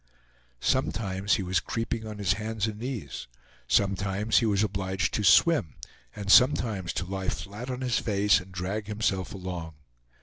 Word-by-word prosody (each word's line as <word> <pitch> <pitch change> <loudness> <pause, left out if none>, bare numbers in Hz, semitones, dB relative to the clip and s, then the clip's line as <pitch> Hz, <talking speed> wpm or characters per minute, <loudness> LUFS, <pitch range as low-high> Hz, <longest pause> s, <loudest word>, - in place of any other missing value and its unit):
Sometimes 100 -1 0
he 100 - -2
was 90 -1 +1
creeping 115 -1 -3
on 105 -1 -7
his 100 -2 +1
hands 110 0 -2
and 105 -1 -5
knees, 115 - -5 0.4
sometimes 100 +2 +2
he 115 - +1
was 100 -1 +2
obliged 95 -2 -1
to 105 - -1
swim, 110 - +4 0.4
and 100 -1 -2
sometimes 110 - +4
to 90 - -2
lie 95 0 -3
flat 105 +6 -6
on 125 0 -4
his 125 -2 +1
face 100 -2 +3
and 95 +1 -12
drag 95 +3 -4
himself 105 -3 -1
along. 90 -4 -6
100 Hz, 160 wpm, -27 LUFS, 95-110 Hz, 0.4 s, swim